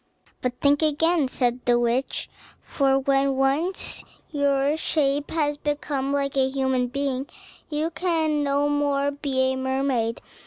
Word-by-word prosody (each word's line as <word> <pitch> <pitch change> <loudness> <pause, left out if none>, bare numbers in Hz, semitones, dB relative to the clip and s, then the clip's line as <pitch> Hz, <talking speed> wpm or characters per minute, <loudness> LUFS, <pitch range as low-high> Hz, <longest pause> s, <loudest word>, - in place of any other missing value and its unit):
"But 250 -1 -3
think 285 +1 +4
again," 315 0 +2
said 250 -1 -1
the 240 -1 +4
witch; 240 +3 0 0.3
"for 270 -1 +1
when 270 0 +2
once 280 +8 0 0.3
your 285 0 +2
shape 290 -2 0
has 295 -2 0
become 290 -2 -2
like 280 -1 -1
a 265 -1 +3
human 265 -2 0
being, 275 0 -2 0.4
you 310 +2 -1
can 320 -4 0
no 285 +1 +1
more 285 -1 +1
be 265 -2 0
a - - -2
mermaid. 260 -3 -1
275 Hz, 140 wpm, -24 LUFS, 265-290 Hz, 0.4 s, think